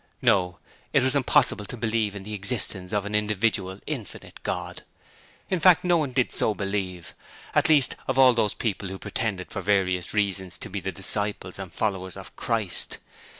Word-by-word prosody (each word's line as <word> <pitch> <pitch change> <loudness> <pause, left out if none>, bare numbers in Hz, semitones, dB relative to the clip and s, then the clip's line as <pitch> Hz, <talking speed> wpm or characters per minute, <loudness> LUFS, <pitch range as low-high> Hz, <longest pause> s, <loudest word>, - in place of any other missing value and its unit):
No; 90 -3 +2 0.4
it - - +4
was 130 +2 +1
impossible 130 -5 +3
to 120 - -7
believe 110 -2 0
in 100 - -7
the 105 +2 -7
existence 100 -3 -1
of 105 -1 0
an 105 - -5
individual, 105 -2 0
infinite 130 -10 -7
God.. - - -4 0.7
In 185 - 0
fact, 175 +1 +6
no 175 -1 +3
one 150 -5 -1
did 125 -1 +1
so 110 - +1
believe; 95 -3 -4 0.4
and - - +3
least 145 -5 +5
of 130 - -1
all 130 -1 +7
those 110 -3 +1
who 100 -4 -2
pretended 95 -2 -3
for 100 - -4
various 95 -2 +1
reasons 95 -4 -1
to - - -9
be - - -3
the - - -4
disciples 100 -3 0
and 95 -3 -7
followers 95 -2 -2
of - - -11
Christ. 110 -6 -1
105 Hz, 175 wpm, -25 LUFS, 95-120 Hz, 0.7 s, all